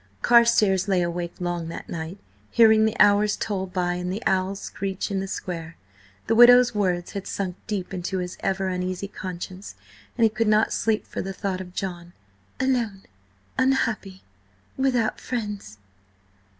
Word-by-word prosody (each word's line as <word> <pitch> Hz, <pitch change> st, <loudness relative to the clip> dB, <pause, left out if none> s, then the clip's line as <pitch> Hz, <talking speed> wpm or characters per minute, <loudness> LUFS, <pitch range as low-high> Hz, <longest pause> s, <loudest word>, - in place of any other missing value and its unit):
Carstares 230 Hz, -5 st, +4 dB
lay 185 Hz, -3 st, +2 dB
awake 170 Hz, 0 st, -3 dB
long 175 Hz, -2 st, -2 dB
that 165 Hz, -, -7 dB
night, 165 Hz, +3 st, -6 dB, 0.3 s
hearing 220 Hz, -2 st, +6 dB
the 220 Hz, -, -1 dB
hours 205 Hz, +1 st, +5 dB
toll 195 Hz, -3 st, -3 dB
by 180 Hz, -1 st, -1 dB
and 180 Hz, 0 st, -3 dB
the 210 Hz, +5 st, -4 dB
owls 190 Hz, +1 st, +1 dB
screech 195 Hz, +1 st, -4 dB
in 195 Hz, -, 0 dB
the 195 Hz, -, -3 dB
square. 165 Hz, -3 st, -6 dB, 0.5 s
The 225 Hz, -, +1 dB
widow's 245 Hz, +1 st, +7 dB
words 180 Hz, -4 st, 0 dB
had 195 Hz, -1 st, -6 dB
sunk 185 Hz, -3 st, -3 dB
deep 195 Hz, -3 st, -3 dB
into 185 Hz, +1 st, -3 dB
his 180 Hz, 0 st, -4 dB
ever 190 Hz, 0 st, -1 dB
uneasy 185 Hz, +1 st, -3 dB
conscience, 185 Hz, -1 st, -7 dB, 0.4 s
and 230 Hz, -, +2 dB
he 225 Hz, -, +6 dB
could 220 Hz, +1 st, -1 dB
not 215 Hz, +1 st, +3 dB
sleep 220 Hz, -1 st, 0 dB
for -, -, -5 dB
the 195 Hz, 0 st, -5 dB
thought 190 Hz, -1 st, -3 dB
of 180 Hz, 0 st, -11 dB
John, 175 Hz, -2 st, -5 dB, 0.5 s
"alone, 235 Hz, -7 st, 0 dB, 0.6 s
unhappy, 225 Hz, -7 st, 0 dB, 0.5 s
without 250 Hz, -4 st, 0 dB
friends." 210 Hz, -, -5 dB
195 Hz, 155 wpm, -24 LUFS, 180-220 Hz, 0.6 s, widow's